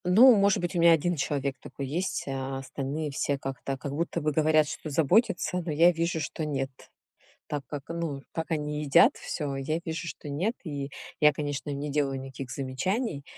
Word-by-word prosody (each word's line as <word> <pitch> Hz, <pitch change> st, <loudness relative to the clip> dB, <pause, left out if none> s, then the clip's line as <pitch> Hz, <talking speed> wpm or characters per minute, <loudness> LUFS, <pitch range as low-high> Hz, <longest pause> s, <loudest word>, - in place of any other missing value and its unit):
Ну, 230 Hz, +8 st, +8 dB
может 200 Hz, -1 st, +4 dB
быть, 175 Hz, +1 st, -2 dB
у -, -, +1 dB
меня 170 Hz, 0 st, +7 dB
1 175 Hz, +2 st, +1 dB
человек 140 Hz, -1 st, -1 dB
такой 140 Hz, -, -7 dB
есть, 175 Hz, +7 st, -2 dB
а 135 Hz, 0 st, -3 dB
остальные 140 Hz, +3 st, -4 dB
все 140 Hz, 0 st, 0 dB
как-то, 135 Hz, 0 st, -4 dB
как 135 Hz, +2 st, -5 dB
будто 170 Hz, +3 st, -1 dB
бы 150 Hz, -1 st, 0 dB
говорят, 155 Hz, 0 st, +4 dB
что 155 Hz, -, -6 dB
заботятся, 180 Hz, -, +2 dB
но 165 Hz, -, -3 dB
я 165 Hz, +4 st, +6 dB
вижу, 165 Hz, 0 st, -1 dB
что 155 Hz, +1 st, -4 dB
нет. 135 Hz, -3 st, -2 dB, 0.8 s
Так 145 Hz, -1 st, -3 dB
как, 140 Hz, +1 st, -6 dB
ну, 165 Hz, -5 st, -3 dB
как 160 Hz, +1 st, -4 dB
они 150 Hz, -1 st, -1 dB
едят 140 Hz, -2 st, +5 dB
всё, 140 Hz, -2 st, -4 dB
я 155 Hz, +5 st, -1 dB
вижу, 165 Hz, +1 st, -4 dB
что 155 Hz, -, -7 dB
нет. 175 Hz, +11 st, -1 dB
И 140 Hz, -4 st, -4 dB, 0.3 s
я, 150 Hz, -1 st, +7 dB
конечно, 145 Hz, 0 st, -3 dB
им 140 Hz, -, -3 dB
не 145 Hz, 0 st, -3 dB
делаю 140 Hz, -2 st, 0 dB
никаких 135 Hz, -1 st, -7 dB
замечаний, 140 Hz, -, -2 dB
150 Hz, 195 wpm, -28 LUFS, 140-170 Hz, 0.8 s, Ну